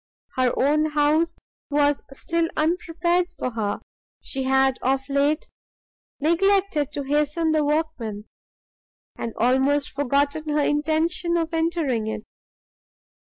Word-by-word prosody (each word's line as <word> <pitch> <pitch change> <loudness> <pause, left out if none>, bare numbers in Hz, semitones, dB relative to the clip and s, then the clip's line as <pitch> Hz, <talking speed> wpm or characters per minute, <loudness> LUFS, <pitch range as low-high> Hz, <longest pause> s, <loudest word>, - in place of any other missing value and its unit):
Her 255 -1 +2
own 300 +3 +3
house 310 +3 +2 0.3
was 290 0 +2
still 330 +4 -1
unprepared 345 +2 +1
for 255 - -2
her; 210 -3 -2 0.4
she 270 - -4
had 265 0 +2
of 270 +1 0
late 285 +3 +1 0.7
neglected 340 -1 +2
to 285 - -3
hasten 300 +3 +1
the 310 -1 +2
workmen, 290 -9 -2 0.9
and 230 - -5
almost 265 +4 +2
forgotten 285 +3 0
her 295 0 +2
intention 325 +4 +1
of 330 0 -2
entering 320 -9 0
it. 220 -1 -4
295 Hz, 110 wpm, -24 LUFS, 270-325 Hz, 0.9 s, own